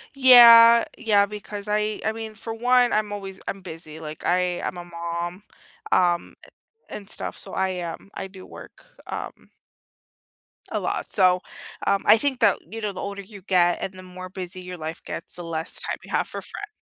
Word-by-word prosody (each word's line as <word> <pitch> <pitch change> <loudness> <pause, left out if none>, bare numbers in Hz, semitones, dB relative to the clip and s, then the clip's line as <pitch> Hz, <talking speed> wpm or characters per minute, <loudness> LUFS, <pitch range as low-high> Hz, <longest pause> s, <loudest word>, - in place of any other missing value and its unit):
Yeah. 235 -3 +9
Yeah, 205 -3 +3
because 210 0 -8
I 210 0 -1
I 220 - +2
mean, 220 -1 -7
for 225 +1 -6
one, 245 +1 +3
I'm 215 -1 0
always 195 -2 -7
I'm 195 - -4
busy. 160 -3 -9
Like, 155 -1 -8
I 180 0 +1
I'm 180 - -4
a 175 - -6
mom, 170 +2 -5 0.5
um, 175 -1 +2 0.3
a 450 +1 -15
and 200 -1 -10
stuff, - - -4
so - - -9
I, 190 -1 -1
um, 170 +3 -7
I - - -5
do 190 -1 -13
work, - - -13 0.2
um - - -7 1.3
a - - 0
lot, - - -2
so, 185 -2 +3 0.4
um, 200 - +2
I 225 - +7
think 270 0 0
that, 205 -5 +4
you 225 - -5
know, 210 -2 -3
the - - -6
older 200 0 -5
you 200 0 -13
get 175 -2 +2
and 190 - -4
the 185 0 -11
more 185 0 -9
busy 185 -1 -7
your 180 0 -8
life 160 +1 -6
gets, - - -7
the 175 - -7
less 165 -1 -4
time - - -3
you - - -15
have - - 0
for - - -5
friend. 420 +1 -9
195 Hz, 195 wpm, -24 LUFS, 180-215 Hz, 1.3 s, Yeah